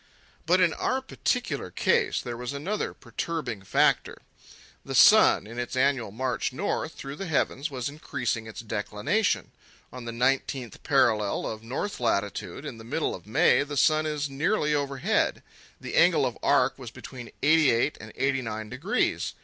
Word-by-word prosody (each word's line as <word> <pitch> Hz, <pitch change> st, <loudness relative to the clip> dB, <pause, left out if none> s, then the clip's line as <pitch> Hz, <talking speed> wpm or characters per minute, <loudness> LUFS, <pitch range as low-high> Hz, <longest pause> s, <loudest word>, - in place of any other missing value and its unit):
But 180 Hz, +3 st, +4 dB
in 175 Hz, -3 st, +4 dB
our 260 Hz, -, 0 dB
particular 245 Hz, -, -2 dB
case -, -, +1 dB
there 120 Hz, -1 st, -5 dB
was 125 Hz, +2 st, -5 dB
another 180 Hz, +10 st, -2 dB
perturbing 135 Hz, -, -4 dB
factor. 95 Hz, -, +2 dB, 0.7 s
The -, -, -5 dB
sun, -, -, +7 dB
in 115 Hz, +3 st, -7 dB
its 120 Hz, +1 st, -4 dB
annual 130 Hz, -4 st, +1 dB
march 125 Hz, +5 st, -2 dB
north 160 Hz, +1 st, -2 dB
through 140 Hz, +1 st, -7 dB
the 195 Hz, -, -5 dB
heavens, 145 Hz, -1 st, 0 dB
was 125 Hz, -3 st, -4 dB
increasing 130 Hz, -6 st, -3 dB
its 110 Hz, -, -8 dB
declination. 110 Hz, -, -1 dB, 0.4 s
On 125 Hz, -2 st, -8 dB
the 115 Hz, -, -4 dB
19th 125 Hz, 0 st, -1 dB
parallel 115 Hz, -7 st, +2 dB
of 110 Hz, 0 st, -5 dB
north 130 Hz, -, -4 dB
latitude 105 Hz, -, -2 dB
in 125 Hz, -6 st, -7 dB
the -, -, -10 dB
middle 150 Hz, +7 st, -1 dB
of 95 Hz, -, -10 dB
May 110 Hz, -, +4 dB
the 145 Hz, 0 st, -4 dB
sun 155 Hz, +2 st, +3 dB
is 150 Hz, -1 st, -2 dB
nearly 150 Hz, +3 st, 0 dB
overhead. 140 Hz, -2 st, 0 dB, 0.4 s
The -, -, -7 dB
angle -, -, +4 dB
of -, -, -2 dB
arc -, -, +2 dB
was -, -, -7 dB
between 120 Hz, -2 st, -10 dB
eighty 155 Hz, -1 st, +5 dB
eight 120 Hz, +6 st, +2 dB
and 110 Hz, -, -10 dB
eighty 135 Hz, 0 st, +1 dB
nine 110 Hz, -2 st, -5 dB
degrees. 135 Hz, -, -1 dB
135 Hz, 165 wpm, -27 LUFS, 115-150 Hz, 0.7 s, sun